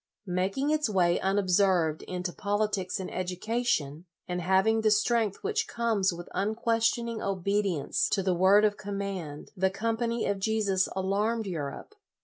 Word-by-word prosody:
Making 195 +10 0
its 305 -5 +1
way 175 -4 +2
unobserved 190 -4 +2
into 180 -1 -4
politics 205 -2 -1
and 185 - -6
education, 180 - -2 0.2
and 180 -1 -2
having 190 +5 +3
the 220 - +3
strength 215 -1 +1
which 440 +2 0
comes 225 -5 +1
with 175 0 -8
unques 225 +2 +1
tioning 235 -2 -4
obedience 195 -4 0
to 195 - 0
the 185 -1 +2
word 190 +4 +5
of 205 -1 +1
com 200 0 -5
mand, 185 -7 -5
the 190 0 +2
Company 230 +3 -1
of 200 -1 -1
Jesus 200 -3 +1
alarmed 205 +4 0
Europe. 160 - -5
200 Hz, 145 wpm, -28 LUFS, 185-220 Hz, 0.2 s, word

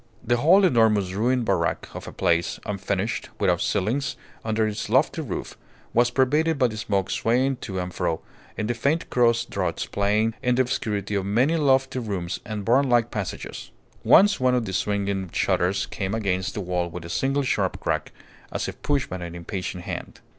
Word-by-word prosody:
The 120 +1 +2
whole 180 +10 +6
enormous 110 - +3
ruined 120 +4 +1
barrack - - 0
of - - -8
a - - -6
place, 85 0 0
unfinished, 100 +1 -2
without 90 -4 +2
ceilings 130 +8 0 0.3
under 110 0 +1
its 105 -1 -4
lofty 135 +7 +2
roof, 130 -11 -5 0.4
was 120 +1 +4
pervaded 150 +5 +2
by 125 -3 +3
the 110 - -7
smoke 100 -3 -1
swaying 130 +3 +1
to 95 -5 -6
and 90 0 -4
fro 80 - -1 0.4
in 110 - -1
the 120 - 0
faint 140 +7 0
cross 120 -1 +3
draughts - - -2
playing 105 +3 +1
in 125 0 +2
the 130 - +4
obscurity 105 -5 -2
of 100 -1 -1
many 125 +10 +2
lofty 135 -3 +2
rooms 100 -6 -3
and 105 -2 -5
barnlike 120 -1 +3
passages. 100 -4 -5 0.3
Once 205 +1 +6
one 130 0 +3
of 120 -2 0
the 95 - -5
swinging 100 -1 -1
shutters 95 +4 +1
came 100 +1 -3
against 95 -3 -1
the 105 - -2
wall 90 -1 -1
with 85 0 -8
a - - -6
single 135 +10 0
sharp 130 - 0
crack, - - -2 0.4
as - - -2
if - - -8
pushed 145 -2 0
by 95 - -5
an 85 -1 -7
impatient 90 +1 -5
hand. - - -6
110 Hz, 180 wpm, -24 LUFS, 95-130 Hz, 0.4 s, whole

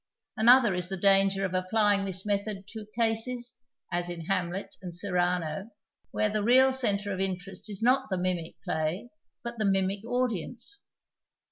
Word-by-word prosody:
Another 235 -1 +6
is 180 0 -1
the 190 - -3
danger 195 0 +3
of 185 - -4
applying 200 +2 +2
this 190 0 -3
method 200 -1 -2
to 220 -2 -8
cases 235 +1 0 0.3
(as 175 0 0
in 175 -1 -5
Hamlet 185 +1 -2
and 180 -2 -6
Cyrano) 180 -1 -1 0.4
where 215 -1 0
the 215 0 0
real 260 +5 +5
centre 205 -6 +1
of 190 - -5
interest 190 +1 -4
is 205 +1 -5
not 260 +1 +3
the 190 - -1
mimic 180 -2 -2
play 160 +9 -2 0.3
but 235 -1 -6
the 215 - +1
mimic 195 +1 +1
audience. 245 - -2
200 Hz, 155 wpm, -28 LUFS, 185-225 Hz, 0.4 s, Another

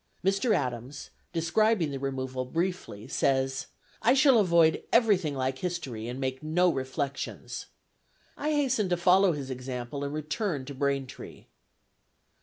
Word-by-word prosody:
Mr. 195 +4 +3
Adams, 125 -1 -4 0.2
describing 170 +1 +2
the 135 - -4
removal 130 -1 -3
briefly, 165 - -3
says, 135 0 0 0.3
"I 245 +3 +4
shall 270 -4 +6
avoid 170 -5 +4
everything 200 - +3
like 130 0 -1
history, 140 -11 -4
and 125 +2 -5
make 130 -1 -2
no 175 +4 +2
reflections." 135 +1 -4 0.7
I 300 - -2
hasten 265 -9 +1
to 175 - +1
follow 185 +1 +5
his 140 -3 -5
example 125 +2 -5
and 140 - -3
return 155 - -2
to 140 - -7
Braintree. 140 -1 -3
150 Hz, 130 wpm, -28 LUFS, 130-185 Hz, 0.7 s, shall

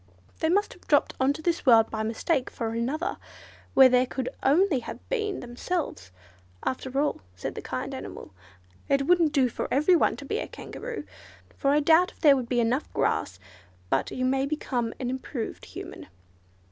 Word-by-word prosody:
They 320 - +1
must 405 +4 +2
have - - -21
dropped - - +3
on 265 +1 +3
to 315 - -9
this 340 0 0
world 230 -4 +6
by 220 - -2
mistake 240 +5 0
for 230 - -3
another, 255 +9 -2 0.6
where 265 -1 +9
there 250 0 +3
could 255 0 -3
only 305 +1 +3
have 235 - -9
been 430 -5 -1
themselves. 245 - -4 0.6
After 260 +1 -2
all," 295 - 0
said 90 - -5
the - - -6
kind - - -4
animal, - - -8 0.6
"It 275 0 +2
wouldn't 340 -2 +4
do 275 -4 +3
for 240 - -4
every 305 +7 +4
one - - +3
to - - -9
be - - -2
a - - -4
Kangaroo, - - -7 0.5
for 275 - 0
I 295 +2 +4
doubt 330 +4 +4
if - - -28
there 290 -3 +7
would 250 -3 -3
be 245 - +1
enough 240 +5 0
grass; 95 - 0 0.5
but 135 - +1
you 255 - -2
may 270 +1 +1
become 250 -6 -2
an 250 -1 -2
improved 260 -2 -5
Human." - - -9
270 Hz, 185 wpm, -27 LUFS, 245-315 Hz, 0.6 s, where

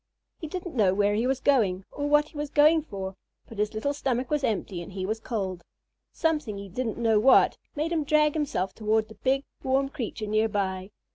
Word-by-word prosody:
He 320 - -5
didn't 360 +2 -6
know 200 -7 +3
where 205 0 +2
he 225 +4 +1
was 265 0 0
going, 205 -10 +2
or 290 0 -3
what 295 +1 +4
he - - -22
was 295 0 -3
going 310 +2 +5
for, 195 -9 -6 0.3
but 225 - -10
his 210 +1 0
little 280 +7 -1
stomach 260 -2 -2
was 295 -2 +1
empty 200 -6 -1
and 175 +3 -9
he 190 -1 -3
was 220 +3 -2
cold. 190 -7 -4 0.5
Something, 300 -11 -1
he 200 0 -8
didn't 225 +3 -3
know 225 -2 +3
what, 260 +5 +5 0.2
made 310 +3 -1
him 325 -3 +1
drag 300 0 +3
himself 280 - -1
toward 220 0 0
the - - -10
big, 265 +6 0 0.2
warm 270 +1 +1
creature 235 -6 -5
near 215 +1 +1
by. 190 -2 -2
230 Hz, 210 wpm, -27 LUFS, 205-290 Hz, 0.5 s, going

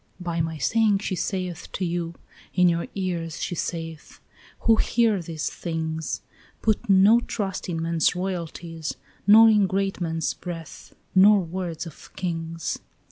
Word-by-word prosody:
"By 170 -2 -1
my 160 0 -2
saying 210 - +3
she 195 -1 -3
saith 180 -2 -3
to 190 - -1
you, 170 -1 -2 0.4
in 180 -1 +5
your 170 -1 +1
ears 170 -4 -3
she - - -2
saith, 165 -2 -5 0.4
Who 225 -1 +4
hear 225 -5 +2
these 160 -2 -4
things, 160 -1 -3 0.4
Put 215 -2 +1
no 200 +4 +7
trust 195 -6 -4
in 165 -2 -2
men's 165 0 +2
royalties, 170 -3 -4 0.3
nor 220 +2 +9
in 210 -3 +5
great 195 0 -1
men's 165 -2 -1
breath, 165 -3 -8 0.2
Nor 200 +2 +7
words 175 -1 -4
of 165 - -12
kings. 165 -2 -3
175 Hz, 140 wpm, -25 LUFS, 165-195 Hz, 0.4 s, nor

